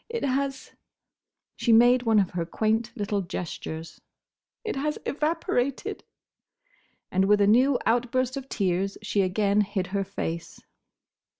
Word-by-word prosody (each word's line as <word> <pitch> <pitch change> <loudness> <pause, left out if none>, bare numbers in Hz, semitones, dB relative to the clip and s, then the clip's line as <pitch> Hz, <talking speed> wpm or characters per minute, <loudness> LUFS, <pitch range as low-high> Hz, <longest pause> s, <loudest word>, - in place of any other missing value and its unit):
It 465 0 -3
has"—she 270 -2 -5
made 240 +2 +6
one 225 -3 +2
of 195 -3 +2
her 175 -2 -2
quaint 220 +6 0
little 205 -1 -1
gestures—"it 170 - -8
has—evaporated!" 300 -2 -2 1.1
And 190 +1 +2
with 205 +1 +4
a 200 - +5
new 250 +6 +4
outburst 245 +2 +1
of 270 -1 -6
tears 195 -1 -1
she 210 -1 +1
again 200 +2 +2
hid 200 -2 -2
her 200 -1 +1
face. 170 -4 -5
220 Hz, 115 wpm, -26 LUFS, 195-255 Hz, 1.1 s, made